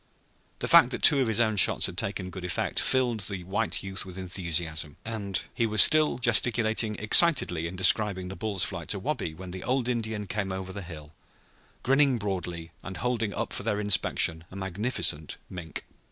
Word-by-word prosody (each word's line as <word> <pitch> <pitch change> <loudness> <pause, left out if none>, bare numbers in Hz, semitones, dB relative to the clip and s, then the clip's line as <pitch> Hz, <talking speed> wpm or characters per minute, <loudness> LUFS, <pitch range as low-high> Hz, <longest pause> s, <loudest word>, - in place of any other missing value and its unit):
The - - -4
fact - - +6
that - - -5
two 145 - +8
of 130 - +1
his 110 -1 0
own 110 -3 +1
shots - - +4
had - - -2
taken 90 0 -4
good 95 0 -9
effect 90 0 -2
filled 125 -4 0
the 95 -2 -2
white 100 +5 -3
youth 95 0 -5
with 95 -1 -11
enthusiasm, 85 -4 -3
and 105 -4 -3
he 115 - 0
was 105 -2 +9
still 155 -1 +3
gesticulating 115 -2 +1
excitedly 105 - +4
in 90 - -8
describing 95 0 +3
the 95 - -8
bull's 105 -4 -1
flight - - -4
to - - -2
Wabi 80 - -4
when 90 +1 -10
the 95 0 -8
old 125 -1 -1
Indian 110 -4 -3
came 100 0 -4
over 95 0 -6
the 100 - -7
hill, 80 -4 -11 0.7
grinning 135 0 +2
broadly, 90 -5 -5
and 95 -1 -8
holding 115 -4 -2
up - - -4
for - - -3
their 105 - -2
inspection 90 -5 +1
a - - -13
magnificent 95 -5 -2
mink. 85 -4 -7
100 Hz, 185 wpm, -26 LUFS, 90-115 Hz, 0.7 s, was